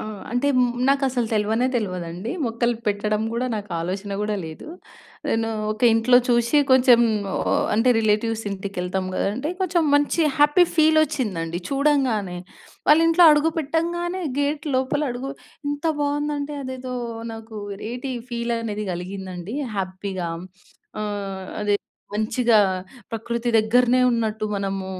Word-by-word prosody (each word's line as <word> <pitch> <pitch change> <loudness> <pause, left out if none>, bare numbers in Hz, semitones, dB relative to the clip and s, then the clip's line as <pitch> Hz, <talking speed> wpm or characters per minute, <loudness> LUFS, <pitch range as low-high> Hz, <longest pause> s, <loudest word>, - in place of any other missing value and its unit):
ఆ! - - -4 0.3
అంటే 245 +4 +1 0.4
నాకసలు 265 -4 +1
తెల్వనే 220 +3 +1
తెల్వదండి. 185 -1 -3 0.2
మొక్కలు 235 +1 0
పెట్టడం 210 +1 0
గూడా 245 +2 -1
నాకాలోచన 195 0 -4
గూడా 210 0 -1
లేదు. 160 -1 -9 0.6
నేను 225 0 +1 0.2
ఒక 215 - -11
ఇంట్లో 235 +2 +5
చూసి 240 +4 +3
కొంచెం 255 -2 +6 0.3
ఆహ్, - - +1
అంటే 225 +4 +3
రిలేటివ్స్ 220 +1 +1
ఇంటికెళ్తాం 190 -1 -3
గదండి! 195 - 0
అంటే 290 +5 -2
కొంచెం 350 -2 +1
మంచి 290 +3 +2 0.2
హ్యాపీ 295 +5 +6
ఫీల్ 315 0 +5
ఒచ్చిందండి 185 - -3
చూడంగానే. 265 -10 +1 0.5
వాళ్ళింట్లో 330 +3 +6
అడుగు 300 +2 +3
పెట్టంగానే 345 +4 -1 0.2
గేట్ 290 +1 0
లోపల 265 +3 0
అడుగు 255 +3 -5 0.4
ఎంత 290 +3 -2
బావుందంటే 290 0 -1
అదేదో 255 -1 -5 0.4
నాకు 225 0 -9 0.4
ఏటి 250 +2 -4 0.2
ఫీలనేది 230 -3 -2
గలిగిందండి 185 +3 -6 0.2
హ్యాపీగా. 185 -2 -3 0.7
ఆహ్, 195 -2 -4
అదే 205 -1 +1 0.4
మంచిగా 220 +2 +2 0.5
ప్రకృతి 235 +1 -3
దగ్గరనే 245 +3 +4
ఉన్నట్టు 220 -2 -1
మనము 195 -1 -2
230 Hz, 120 wpm, -23 LUFS, 205-275 Hz, 0.7 s, కొంచెం